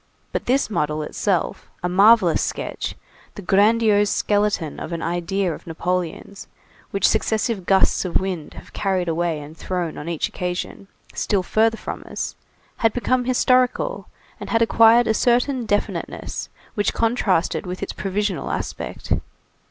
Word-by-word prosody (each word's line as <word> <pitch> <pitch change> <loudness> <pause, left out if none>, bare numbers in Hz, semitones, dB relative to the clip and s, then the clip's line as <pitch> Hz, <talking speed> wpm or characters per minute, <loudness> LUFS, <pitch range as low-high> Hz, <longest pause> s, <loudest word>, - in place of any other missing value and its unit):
But - - -3
this 265 +3 +2
model 150 -6 -1
itself, 180 +3 -1
a - - +1
marvellous 195 0 +5
sketch, - - -3 0.4
the 205 - -8
grandiose 205 +1 +4
skeleton 205 -6 0
of 170 - -5
an 165 - -3
idea 175 +2 -1
of - - -11
Napoleon's, 180 +3 -3 0.4
which 195 -1 +2
successive 220 -3 0
gusts 195 -1 +3
of 180 -3 +1
wind 185 -5 -4
have - - -12
carried 190 -3 0
away 165 -1 0
and 150 +2 -10
thrown, 175 -2 -3
on 150 - -6
each 165 -3 -1
occasion, 180 +2 -4 0.3
still 200 -3 0
further 225 +4 +2
from - - -6
us, - - -4 0.4
had 225 -1 +2
become 250 0 +1
historical 255 - +2 0.3
and - - -7
had 230 0 +3
acquired 230 +1 +6
a 220 - +2
certain 245 +1 +1
definiteness 205 0 -2 0.2
which 205 -2 0
contrasted 215 -7 +1
with 180 +1 -4
its - - -4
provisional 195 -1 -2
aspect. - - -4
195 Hz, 145 wpm, -22 LUFS, 175-225 Hz, 0.4 s, acquired